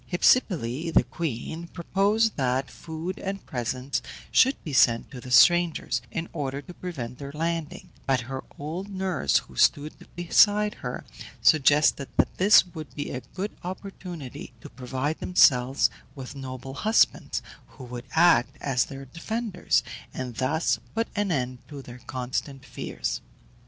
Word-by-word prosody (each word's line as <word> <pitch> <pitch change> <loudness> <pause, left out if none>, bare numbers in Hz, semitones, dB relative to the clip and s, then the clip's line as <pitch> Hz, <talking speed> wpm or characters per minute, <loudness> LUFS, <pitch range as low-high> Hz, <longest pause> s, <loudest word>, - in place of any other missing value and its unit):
Hypsipyle, 165 - +2
the - - +5
queen, 160 +4 -4
proposed 200 +6 +1
that 130 0 0
food 165 +3 -6
and 195 0 -5
presents 125 +2 -2 0.3
should 265 +2 +5
be 150 - -5
sent 115 -3 +4
to 125 -3 -8
the 125 - -9
strangers, 165 -1 +4
in 165 +7 -4
order 140 -3 -3
to 145 +5 -10
prevent 130 -10 -6
their 140 -1 -6
landing; 165 0 -3 0.2
but 130 -2 +2
her 130 +2 -6
old 165 +7 -5
nurse, 185 - +1
who - - -6
stood 150 +1 +3 0.2
beside 205 +4 +4
her, 125 0 -5 0.4
suggested 145 -2 +4
that - - +2
this 200 +2 +7
would 155 -3 -8
be 145 - -4
a 130 - -4
good 195 +3 -3
opportunity 180 -8 -7
to - - -10
provide 130 +5 -3
themselves 135 -7 +4 0.2
with 135 0 -8
noble 135 -1 -7
husbands, 220 +10 +2 0.2
who 135 - -13
would 120 0 -7
act 165 -7 +4
as 125 -4 +1
their 135 0 -9
defenders, 205 - -1 0.3
and 125 -3 -5
thus 130 -3 +1 0.2
put 225 0 0
an 205 -2 0
end 130 -4 -1
to 145 -3 -9
their 125 0 -11
constant 130 +2 -4
fears. - - -4
145 Hz, 145 wpm, -26 LUFS, 130-175 Hz, 0.4 s, this